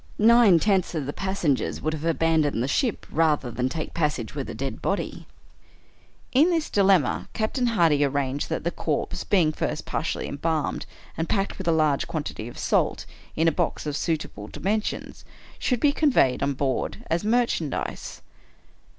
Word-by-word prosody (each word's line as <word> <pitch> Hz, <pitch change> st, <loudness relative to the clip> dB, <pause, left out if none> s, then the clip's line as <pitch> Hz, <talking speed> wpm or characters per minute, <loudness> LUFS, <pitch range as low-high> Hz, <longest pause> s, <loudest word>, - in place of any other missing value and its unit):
Nine 225 Hz, -4 st, +6 dB
tenths 190 Hz, -1 st, +1 dB
of 150 Hz, -4 st, -2 dB
the 145 Hz, -, -4 dB
passen 190 Hz, -7 st, 0 dB
gers -, -, -4 dB
would 155 Hz, -, -2 dB
have 155 Hz, 0 st, -5 dB
abandoned 160 Hz, -6 st, +2 dB
the -, -, -1 dB
ship 225 Hz, -, 0 dB
rather 150 Hz, -6 st, +1 dB
than 125 Hz, +2 st, -1 dB
take 155 Hz, +3 st, -5 dB
pas 150 Hz, -3 st, +1 dB
sage -, -, -6 dB
with -, -, -4 dB
a -, -, -6 dB
dead -, -, -4 dB
body. -, -, -3 dB, 1.0 s
In 295 Hz, +7 st, +5 dB
this 330 Hz, -3 st, 0 dB
dilemma, 190 Hz, -9 st, +3 dB
Captain 240 Hz, +3 st, 0 dB
Hardy 165 Hz, -10 st, +3 dB
arranged 140 Hz, 0 st, -1 dB
that 160 Hz, -, -2 dB
the 170 Hz, -, 0 dB
corpse, 155 Hz, -4 st, -2 dB
being 175 Hz, -6 st, +3 dB
first -, -, -3 dB
partially -, -, -2 dB
embalmed, 155 Hz, +1 st, -2 dB, 0.3 s
and 165 Hz, -, -3 dB
packed, 195 Hz, -1 st, -1 dB
with 190 Hz, -, -5 dB
a -, -, +5 dB
large 155 Hz, -3 st, +2 dB
quantity 145 Hz, -7 st, -4 dB
of 120 Hz, -, -10 dB
salt, -, -, 0 dB, 0.3 s
in 165 Hz, +1 st, +2 dB
a -, -, +5 dB
box 170 Hz, 0 st, -2 dB
of 150 Hz, -1 st, -2 dB
suitable 150 Hz, -, -3 dB
dimensions, 210 Hz, -, -3 dB, 0.4 s
should 250 Hz, -3 st, 0 dB
be 290 Hz, -, +4 dB
conveyed 280 Hz, -, +3 dB
on 140 Hz, 0 st, +1 dB
board 135 Hz, -1 st, -2 dB
as 170 Hz, +3 st, +1 dB
merchandise. 220 Hz, -, -1 dB
165 Hz, 170 wpm, -25 LUFS, 145-200 Hz, 1.0 s, Nine